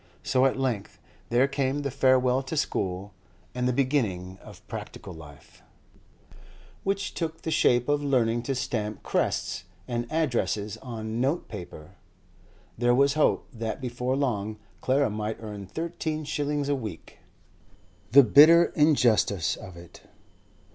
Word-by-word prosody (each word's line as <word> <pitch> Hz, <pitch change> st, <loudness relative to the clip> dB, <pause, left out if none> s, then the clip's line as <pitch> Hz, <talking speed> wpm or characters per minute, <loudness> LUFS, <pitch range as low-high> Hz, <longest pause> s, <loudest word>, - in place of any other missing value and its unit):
So 130 Hz, 0 st, +3 dB
at 130 Hz, -, -2 dB
length 125 Hz, -7 st, -2 dB, 0.3 s
there 125 Hz, +3 st, +3 dB
came 140 Hz, +1 st, -1 dB
the 140 Hz, -, -2 dB
farewell 130 Hz, -1 st, +3 dB
to 135 Hz, +4 st, -5 dB
school 95 Hz, -7 st, -2 dB, 0.4 s
and 125 Hz, 0 st, -1 dB
the -, -, +2 dB
beginning 110 Hz, -9 st, -1 dB
of -, -, -14 dB
practical 95 Hz, -, -8 dB
life, 75 Hz, -3 st, -14 dB, 1.2 s
which 195 Hz, 0 st, -1 dB
took 160 Hz, -1 st, -4 dB
the 160 Hz, -, -2 dB
shape 120 Hz, -5 st, +3 dB
of 145 Hz, 0 st, +1 dB
learning 120 Hz, -4 st, +2 dB
to 135 Hz, -, +1 dB
stamp 115 Hz, -5 st, -3 dB
crests -, -, -1 dB, 0.2 s
and 120 Hz, -1 st, -3 dB
addresses 120 Hz, -9 st, -1 dB
on 115 Hz, -2 st, -5 dB
note 140 Hz, +7 st, 0 dB
paper. 90 Hz, -7 st, -10 dB, 0.8 s
There 120 Hz, 0 st, +3 dB
was 140 Hz, +1 st, +4 dB
hope 155 Hz, 0 st, +2 dB
that 115 Hz, 0 st, -4 dB
before 125 Hz, 0 st, -2 dB
long 110 Hz, -6 st, -1 dB, 0.2 s
Clara 135 Hz, -2 st, +2 dB
might 105 Hz, +1 st, -3 dB
earn 105 Hz, -3 st, -7 dB
thirteen 160 Hz, -, -4 dB
shillings 145 Hz, -1 st, -2 dB
a 145 Hz, -, +2 dB
week. 110 Hz, -, -7 dB, 0.9 s
The 140 Hz, +3 st, +9 dB
bitter 155 Hz, +8 st, +7 dB
injustice 120 Hz, -, +3 dB
of 95 Hz, -3 st, -11 dB
it! 85 Hz, 0 st, -13 dB
125 Hz, 135 wpm, -27 LUFS, 110-140 Hz, 1.2 s, The